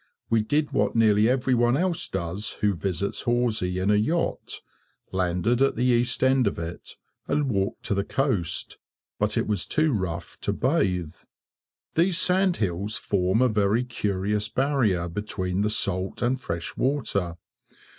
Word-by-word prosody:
We 115 -1 +4
did 145 +7 0
what 105 +2 0
nearly 110 -1 +4
every 130 0 +1
one 120 +1 +3
else 175 0 0
does 95 +3 -2
who 105 -2 +3
visits 95 +1 -2
Horsey 120 -7 0
in 95 +2 +1
a - - +4
yacht; 155 +12 -1 0.5
landed 95 +6 0
at 135 - +3
the 120 - -1
east 120 0 +2
end 130 -3 +3
of - - -2
it, 85 +1 -7 0.3
and 145 -3 0
walked 100 -1 -2
to - - 0
the 100 0 0
coast, 110 - -1 0.4
but - - +1
it - - +1
was 105 -4 +1
too 155 -2 +2
rough 85 -5 -4
to - - -1
bathe. 90 - 0 0.8
These 170 +1 +2
sand 185 0 +3
hills 100 +1 -1
form 95 +4 +1
a - - +5
very 105 +1 +1
curious 105 -2 -1
barrier 120 -11 +1
between 95 0 -3
the 105 - +1
salt 95 -1 0
and 125 +2 0
fresh 85 -6 -4
water. 100 -11 0
105 Hz, 155 wpm, -25 LUFS, 95-130 Hz, 0.8 s, a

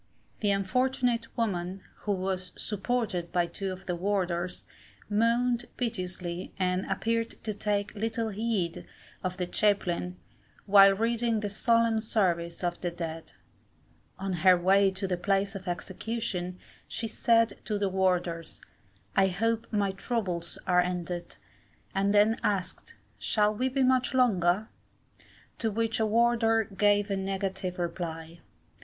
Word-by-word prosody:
The 210 - +1
unfortunate 240 +4 +1
woman, 190 -4 -2
who 205 - -1
was 185 -1 -3
supported 210 -4 -2
by 175 -1 +2
two 190 +2 -4
of 185 +1 -8
the 180 - -1
warders, 180 -1 -1 0.5
moaned 235 +3 +2
piteously, 180 -6 -3
and 185 0 0
appeared 230 0 0
to 215 - -2
take 205 0 -1
little 225 +1 -2
heed 205 -5 -2 0.4
of 185 -1 -2
the 180 - -1
chaplain, 180 -2 0 0.5
while 195 -1 +7
reading 230 +1 +1
the 205 - -2
solemn 230 +1 +2
service 175 -6 0
of 175 0 -2
the 175 - 0
dead. 165 -2 -6 0.8
On 195 0 -3
her 180 +1 +5
way 195 +3 +4
to 190 +1 -3
the 180 -1 -1
place 195 +2 +1
of 195 -2 -8
execution, 185 0 -3 0.3
she 230 - -3
said 230 +1 +2
to 210 - -1
the 200 -1 +1
warders, 180 -3 0 0.6
I 195 0 +5
hope 225 +4 0
my 205 -3 +1
trubles 190 -5 -3
are 180 -1 +4
ended, 175 -1 -3 0.6
and 195 +1 +2
then 210 +2 +4
asked, 195 -3 -2 0.2
'Shall 210 -1 +2
we 255 +5 0
be 265 +1 +1
much 255 0 +2
longer?' 205 -5 +3 0.9
to 225 - +1
which 225 +1 -1
a 220 - +2
warder 225 0 +3
gave 205 0 +2
a - - +1
negative 190 -1 -3
reply. 170 -1 -4
195 Hz, 135 wpm, -29 LUFS, 180-225 Hz, 0.9 s, while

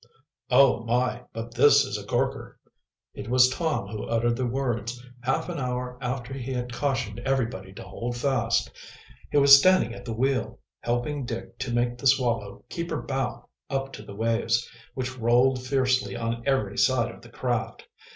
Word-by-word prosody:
"Oh, 135 -4 +5
my, 125 +1 0
but 115 +1 -7
this 140 +3 +6
is 130 - -4
a 105 - -4
corker!" 135 +6 -2 0.5
It - - -7
was 125 0 +6
Tom 155 - -1
who 105 +1 -5
uttered 115 +1 +1
the 125 0 -1
words, 120 -2 -2 0.2
half 130 +2 -1
an - - -4
hour 125 -1 -3
after 125 0 -3
he 135 -1 -5
had 125 -1 -4
cautioned 125 -5 -2
everybody 120 -7 -2
to - - -9
hold 120 +1 -5
fast. 120 -3 +1 0.6
He - - +1
was 140 -1 +10
standing 185 -4 +4
at - - -9
the 115 - -3
wheel, 135 +3 -1 0.2
helping 120 +4 -2
Dick 115 -1 -6
to 130 -1 -3
make 120 0 0
the 135 - +1
Swallow 115 -6 +1
keep 170 0 -5
her 160 - -2
bow 135 -2 -3 0.2
up 135 0 -2
to - - -8
the 100 - -10
waves, 115 +2 0 0.3
which 130 0 -4
rolled 125 +3 +3
fiercely 130 -1 +1
on 115 0 -2
every 105 -7 0
side 120 -3 +2
of - - -15
the 120 - -14
craft. 120 -2 -3
125 Hz, 175 wpm, -26 LUFS, 115-135 Hz, 0.6 s, was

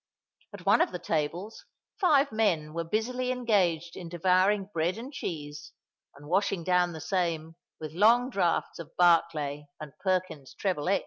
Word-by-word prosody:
At 200 -4 -11
one 205 +4 +5
of - - +1
the 180 - -4
tables 170 +5 -3 0.4
five 290 - +4
men 170 -9 0
were 170 0 -2
busily 245 +8 -2
engaged 185 -9 0
in 175 -3 -8
devouring 185 +4 +2
bread 170 +4 0
and 255 +5 -8
cheese 150 - -6 0.4
and 145 +1 -14
washing 190 0 0
down 180 0 +2
the 160 - -7
same 165 -2 -2 0.2
with 155 -2 -6
long 230 +9 +4
draughts 175 -7 0
of 165 -1 -10
Barclay 155 -4 +2
and 155 -3 -9
Perkins's 185 -7 -2
Treble 180 -5 -1
X. 200 - +3
180 Hz, 155 wpm, -28 LUFS, 160-205 Hz, 0.4 s, one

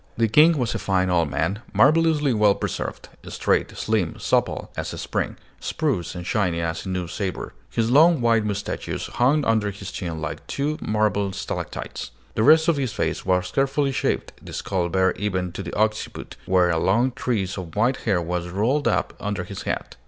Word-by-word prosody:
The 115 0 +3
King 155 +8 +6
was 125 -4 0
a - - -2
fine 95 -1 +1
old 85 -4 +2
man, 95 +9 -1
marvelously 150 -1 +4
well 105 -2 +4
preserved, - - -4 0.2
straight, - - 0
slim, 105 -7 0
supple - - 0
as - - -4
a - - -6
spring, - - -2 0.2
spruce 105 - -2
and 90 -1 -6
shining 90 -4 0
as 85 +2 -3
a - - -3
new 90 -1 -2
sabre. 95 +1 -4 0.2
His 115 0 0
long 160 +3 +6
white 115 -2 +3
moustachios 105 -1 -3
hung 140 +4 +2
under 110 -2 +2
his 100 +1 -7
chin 85 -4 -4
like 80 -2 -5
two 150 +2 -2
marble 105 -2 0
stalactites. - - -5 0.2
The - - 0
rest 160 +6 +6
of 165 -3 +3
his 130 -5 -1
face - - -2
was 90 0 +1
carefully 140 +1 +1
shaved, 130 - -1
the - - -10
skull 90 -3 -1
bare 95 +1 +3
even 95 -3 -1
to 95 - -6
the 85 - -6
occiput, 110 0 -1
where 90 -1 +4
a 80 - +1
long 115 +9 +2
tress 105 -7 -2
of 90 -4 -7
white 120 +5 +2
hair 100 -6 0
was 85 +1 -3
rolled 115 +10 +1
up 90 -5 +1
under 100 -3 -2
his 95 +2 -7
hat. - - -4
105 Hz, 190 wpm, -23 LUFS, 90-125 Hz, 0.2 s, King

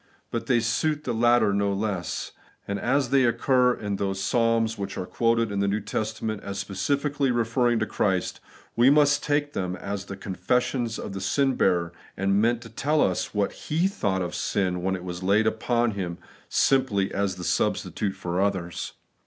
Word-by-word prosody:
But 115 - -3
they 125 -3 +4
suit 150 +7 0
the 125 - -2
latter 120 -2 +3
no 100 0 +1
less; 100 -3 -3 0.4
and 100 0 -2
as 130 +2 +1
they 135 -1 +5
occur 125 +1 +3
in 100 -2 -3
those 95 -1 -2
Psalms 115 +2 +1
which 100 -2 -5
are 90 - -3
quoted 115 +1 +1
in 100 - -2
the 100 - +1
New 100 +2 +1
Testament 110 +1 -3
as 100 0 -6
specially 140 +9 -1
referring 120 0 +2
to 110 - 0
Christ, 95 -3 -1 0.4
we 120 +3 +6
must 145 -1 +4
take 145 0 0
them 90 -1 -2
as 100 +1 -5
the 100 -1 -7
con 95 -1 -6
fessions 120 +3 0
of 100 - -6
the 95 - -5
sin 135 +8 +2
bearer, 85 -6 +1 0.2
and 100 +1 +2
meant 115 +1 +1
to 115 - -11
tell 150 +7 0
us 95 -1 0
what 100 -1 +1
He 165 +5 0
thought 95 - -1
of 90 - -4
sin 90 -3 -1
when 95 +1 0
it 90 - -7
was 90 -1 -6
laid 100 +4 +3
upon 120 +1 +1
Him 90 -4 -4 0.3
simply 125 -8 +2
as 100 -2 -1
a 90 - -6
substitute 100 +2 -1
for 90 -1 -2
others. 95 -4 -2
105 Hz, 185 wpm, -26 LUFS, 95-120 Hz, 0.4 s, we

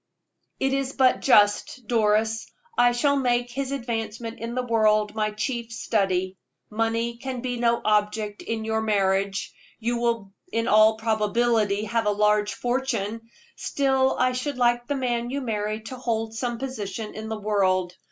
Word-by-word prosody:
"It 270 0 +1
is 275 0 -1
but 260 -2 +3
just, 210 +1 +3
Doris. 220 -1 +1 0.3
I 245 0 +5
shall 280 +4 +2
make 245 -2 +1
his 270 +1 -3
advancement 230 -3 -4
in 230 +1 -5
the 255 - 0
world 215 -2 +2
my 215 -1 0
chief 235 +2 -3
study. 190 -4 0 0.3
Money 230 +2 -1
can 255 0 -5
be 245 -1 -3
no 235 0 +2
object 210 0 0
in 225 -1 -3
your 220 0 0
marriage 195 -2 0 0.2
you 235 +1 -1
will 230 -4 -1 0.2
in 230 0 0
all 215 +1 +5
probability 220 -1 +1
have 225 0 -1
a - - +4
large 210 0 +2
fortune 230 -3 -2 0.3
still 265 -1 +1
I 255 0 +3
should 255 +2 -3
like 240 -1 +2
the 285 - -1
man 240 -2 -1
you 275 +2 -2
marry 215 -3 -2
to 240 +4 -8
hold 225 -3 -2
some 240 +1 -3
position 220 -5 -5
in 220 +1 -6
the 220 -1 -4
world. 185 -4 +1
225 Hz, 160 wpm, -25 LUFS, 210-245 Hz, 0.3 s, I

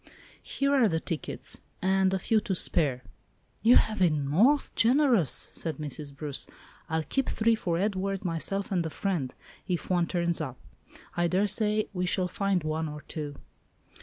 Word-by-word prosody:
Here 275 0 0
are 250 -6 +5
the 160 -2 0
tickets, 160 -1 -4 0.2
and 190 0 +2
a 190 - +1
few 215 +4 +2
to 195 -2 -2
spare." 135 -7 +1 0.6
"You 235 +2 +6
have 215 -1 +3
been 155 -6 +2
most 235 - +3
generous," 240 - +4 0.2
said 160 -2 -3
Mrs. 150 -1 -5
Bruce. 145 -1 -3 0.4
"I'll 160 -1 0
keep 270 - -1
three 230 +1 +2
for 175 -6 -1
Edward, 195 0 -1
myself, 190 +4 -1
and 180 -3 +1
a 160 - -3
friend, 160 -7 -2 0.4
if 180 0 -2
one 175 -2 +2
turns 170 -2 0
up. 130 -5 -5 0.6
I 175 0 +2
daresay 210 +3 +1
we 180 -1 -1
shall 180 0 +1
find 195 -1 0
one 155 0 -2
or 150 0 -7
two." 150 -3 -6
180 Hz, 165 wpm, -28 LUFS, 160-205 Hz, 0.6 s, You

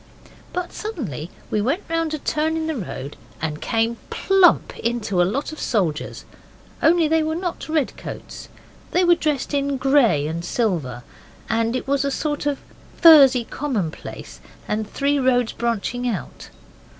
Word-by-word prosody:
But 360 -1 -4
suddenly 225 - -5 0.2
we 210 - +1
went 275 - 0
round 330 -1 -1
a - - -4
turn 310 +2 -1
in 320 - -2
the 320 -1 -2
road 145 - -6 0.2
and 150 -1 -3
came 230 0 0
plump 385 -2 +3
into 220 -6 0
a - - +4
lot 275 +9 -2
of 310 - -9
soldiers. 175 -10 -1 0.6
Only 330 -1 +4
they 320 +1 +3
were 315 +1 -1
not 345 -2 -4
red 310 -4 0
coats. - - -8 0.4
They 365 - +2
were 350 -1 +6
dressed 300 -4 -1
in 280 -1 0
grey 260 - +3
and 165 +2 -3
silver. 165 - -1 0.5
And 230 +1 +1
it 255 - -3
was 280 0 +1
a 280 - 0
sort 295 +1 -2
of 285 -1 0 0.4
furzy 275 -7 +8
common 225 - -2
place, - - -10 0.3
and 215 0 -2
three 285 +3 +1
roads 250 -3 +2
branching 235 +1 -2
out. 215 - -6
265 Hz, 160 wpm, -22 LUFS, 215-310 Hz, 0.6 s, furzy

